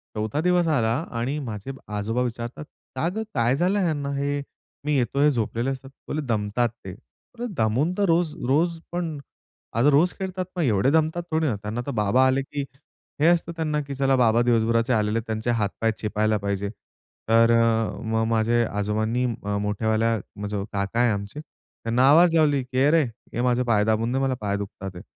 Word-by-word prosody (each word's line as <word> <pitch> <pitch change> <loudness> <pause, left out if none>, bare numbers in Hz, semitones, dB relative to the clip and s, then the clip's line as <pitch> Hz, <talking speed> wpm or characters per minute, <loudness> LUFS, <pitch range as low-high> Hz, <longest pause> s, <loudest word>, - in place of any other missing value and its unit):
4 110 +8 -1
दिवस 180 0 +2
आला 115 -8 +2 0.3
आणि 135 +6 -1
माझे 115 -2 -5 0.2
आजोबा 110 +4 -1
विचारतात, 120 +3 -4 0.3
"का 130 +6 0
गं, 220 - -1
काय 120 0 +2
झालं 180 +7 +1
ह्यांना 150 -6 -1
हे 145 +1 -1 0.4
मी 150 0 +1
येतोय 135 +3 +1
हे 150 - +5
झोपलेले 115 +1 -1
असतात?" 135 0 -5 0.2
बोलले, 155 - -2
"दमतात 115 +1 0
ते, 95 - -6
अरे 235 - -11
दमून 115 +9 +1
तर 205 - +1
रोज 165 -2 +2
रोज 165 +5 +2
पण, 170 -3 -3 0.6
अगं 120 +6 +4
रोज 160 +6 +4
खेळतात 185 -1 -3
मग 175 - +1
एवढे 120 0 +2
दमतात 160 +2 +1
थोडी 160 0 +1
ना? 120 - 0
त्यांना 105 +4 -4
तर - - -1
बाबा 115 +2 +3
आले, 130 +1 +2
की 140 +1 -4 0.6
हे 155 - +5
असतं 170 -1 +2
त्यांना 155 -2 -1
की 140 -1 -6
चला 135 0 +2
बाबा 120 -1 +4
दिवसभराचे 115 +1 +2
आलेले 105 0 +1
त्यांचे 110 +2 -1
हातपाय 115 0 0
चेपायला 110 0 0
पाहिजे." 100 0 -2 0.6
तर 115 +1 +5
अ, 115 -1 +2
मग 110 0 0
माझे 115 +1 +2
आजोबांनी 110 +4 -1
मोठयावाल्या 110 0 0 0.2
मग 105 0 -5
जो 100 -1 -3
काका 100 +3 -1
आहे 120 -1 +4
आमचे 100 +6 -4
त्यांना 125 -3 -1
आवाज 170 +3 +6
लावली 145 -4 +3
की 130 +1 0
"अरे 160 +2 +4 0.3
ये 120 - -1
माझे 125 0 +2
पाय 110 -4 +2
दाबून 110 +2 +1
दे, 135 - +1
मला 135 -1 +1
पाय 100 -1 -1
दुखतात 100 -1 -6
आहेत." 90 - -9
120 Hz, 185 wpm, -24 LUFS, 110-145 Hz, 0.6 s, आवाज